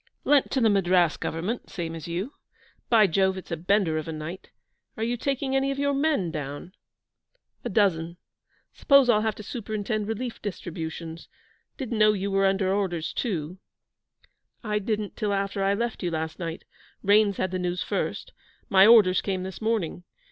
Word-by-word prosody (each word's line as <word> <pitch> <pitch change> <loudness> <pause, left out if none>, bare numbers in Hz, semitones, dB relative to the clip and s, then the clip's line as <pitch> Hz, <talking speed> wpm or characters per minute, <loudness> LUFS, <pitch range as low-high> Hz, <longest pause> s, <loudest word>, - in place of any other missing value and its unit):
'Lent 285 -2 +3
to 265 - 0
the 230 - +4
Madras 180 -4 +3
Government, 180 +10 -4
same 170 -4 -4
as 165 -1 -7
you. 185 +11 -3 0.6
By 225 -3 +6
Jove, 190 +1 +2
it's 185 - -9
a - - 0
bender 175 -1 +1
of 155 - -7
a - - -3
night! 160 +4 -7 0.5
Are 220 - -2
you 235 +2 0
taking 270 +2 -1
any 270 0 +2
of 275 - -2
your 285 0 +1
men 280 - +1
down?' 145 +3 -6 0.9
'A - - -3
dozen. 170 -6 +1 0.6
Suppose 275 -3 +5
I'll 215 -2 +3
have 220 -1 -1
to 215 - -9
superintend 215 -1 -3
relief 230 +2 -4
distributions. 165 -4 -6 0.5
Didn't 245 -5 -3
know 215 0 +6
you 200 0 -2
were 195 0 +3
under 190 0 +1
orders 175 -5 -1
too.' 180 - -3 1.0
'I 210 -2 0
didn't 210 -1 -3
till 210 -3 -1
after 195 0 -1
I 195 +1 +2
left 235 +1 -3
you 180 - -1
last 160 0 -4
night. 165 -2 -5 0.4
Raines 205 0 +4
had 185 - -1
the 185 - -2
news 180 0 -2
first. - - -3 0.4
My 195 -2 +7
orders 210 -6 +6
came 190 -2 -2
this 190 +1 -7
morning. 215 -6 -1
195 Hz, 175 wpm, -26 LUFS, 175-220 Hz, 1.0 s, My